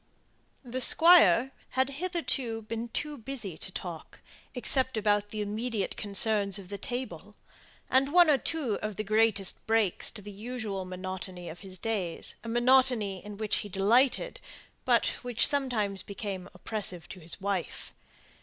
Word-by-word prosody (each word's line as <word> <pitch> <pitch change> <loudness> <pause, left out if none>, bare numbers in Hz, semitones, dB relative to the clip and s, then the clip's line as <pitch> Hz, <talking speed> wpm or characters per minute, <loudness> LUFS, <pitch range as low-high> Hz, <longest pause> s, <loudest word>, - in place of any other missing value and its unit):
The 250 +1 -3
Squire 270 - +7 0.3
had 260 +1 +2
hitherto 275 - -2
been 230 +2 -5
too 295 +4 -4
busy 230 -7 -5
to 190 - -5
talk, 175 -3 -8 0.4
except 260 0 +1
about 205 -1 +1
the 215 0 -4
immediate 215 0 -3
concerns 205 -1 +4
of 190 -2 -10
the 200 -1 -6
table, 250 +5 -6 0.5
and 270 +2 +2
one 350 0 +6
or 290 -3 +4
two 275 -10 -1
of 215 -1 -4
the 215 - -3
greatest 215 -2 +1
breaks 220 -4 +2
to 210 -3 -8
the 205 - -8
usual 210 -2 -5
monotony 185 -1 -6
of 165 +2 -9
his 190 -1 -8
days; 190 -5 -3
a 230 - -6
monotony 240 -5 +2
in 210 -1 -9
which 215 0 -1
he 205 - -5
delighted, 240 - +2 0.5
but - - +3 0.2
which 245 -3 +4
sometimes 235 -9 0
became 195 -2 -6
oppressive 190 -6 -4
to 190 - -9
his 165 +3 -4
wife. 195 -3 -4
215 Hz, 150 wpm, -29 LUFS, 195-250 Hz, 0.5 s, Squire